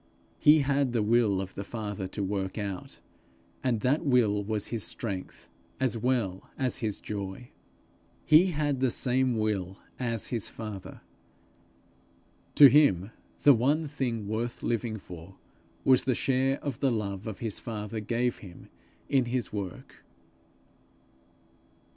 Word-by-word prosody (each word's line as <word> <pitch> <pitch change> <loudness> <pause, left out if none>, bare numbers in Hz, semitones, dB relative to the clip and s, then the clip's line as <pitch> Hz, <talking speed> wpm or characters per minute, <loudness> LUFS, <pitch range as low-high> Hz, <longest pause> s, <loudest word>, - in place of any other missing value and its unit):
He 150 +1 +6
had 140 -2 +1
the 115 -3 +1
will 110 -3 +3
of 95 -1 -7
the 100 - -5
Father 105 -3 -5
to 100 +2 -4
work 95 0 -3
out, 100 -3 -5 0.7
and 120 -4 0
that 140 +8 +1
will 115 -8 +3
was 105 0 -2
his 115 -3 -2
strength 100 -5 -4 0.3
as 130 -2 0
well 115 -6 -1
as 130 -2 -1
his 105 -3 -2
joy. 100 +3 -6 0.8
He 155 +5 +6
had 150 -5 -1
the 130 -1 +2
same 125 0 +1
will 100 -4 -1 0.2
as 115 -4 -2
his 115 -4 -1
father. 105 -4 -8 1.5
To 145 - +10
him 115 - +5 0.3
the 145 - +8
one 145 +7 +1
thing 125 -7 -3
worth 115 +3 -3
living 115 -1 -1
for, 90 -1 -11 0.5
was 130 -1 +5
the 130 -1 +2
share 135 +2 +1
the 135 -1 -1
love 100 -2 -3
of 110 -3 -5
his 110 -4 -3
father 110 -1 -5
gave 120 +3 -1
him 90 -4 -13 0.4
in 135 -3 +2
his 120 -2 -2
work. 100 -4 -7
115 Hz, 135 wpm, -28 LUFS, 100-130 Hz, 1.5 s, To